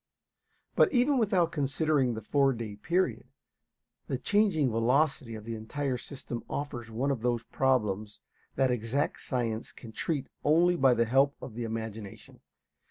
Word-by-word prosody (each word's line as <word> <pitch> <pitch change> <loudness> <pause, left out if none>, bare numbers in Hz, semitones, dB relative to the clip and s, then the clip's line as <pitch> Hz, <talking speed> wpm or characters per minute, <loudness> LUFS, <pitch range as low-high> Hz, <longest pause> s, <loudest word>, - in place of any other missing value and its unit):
But - - +5
even 260 +1 +3
without 190 -7 +2
considering 140 -3 +1
the 110 - -6
four 135 +3 +3
day 110 -3 -6
period, 175 - -1 0.8
the - - -1
changing 195 - +2
velocity 125 +1 +1
of 110 - -8
the 115 +1 -5
entire 125 +4 -3
system 120 -2 -7
offers 120 -5 -4
one 125 +5 -1
of 130 -5 -2
those 120 -1 0
problems 110 -6 0 0.4
that 130 -1 +2
exact 125 +5 -1
science 115 -3 -2
can 115 - -12
treat 140 +3 -2 0.2
only 170 +4 +4
by 135 -6 +4
the 115 0 +2
help 135 +4 +3
of 120 - -8
the 120 +1 -4
imagination. 110 -2 -7
130 Hz, 150 wpm, -29 LUFS, 115-145 Hz, 0.8 s, But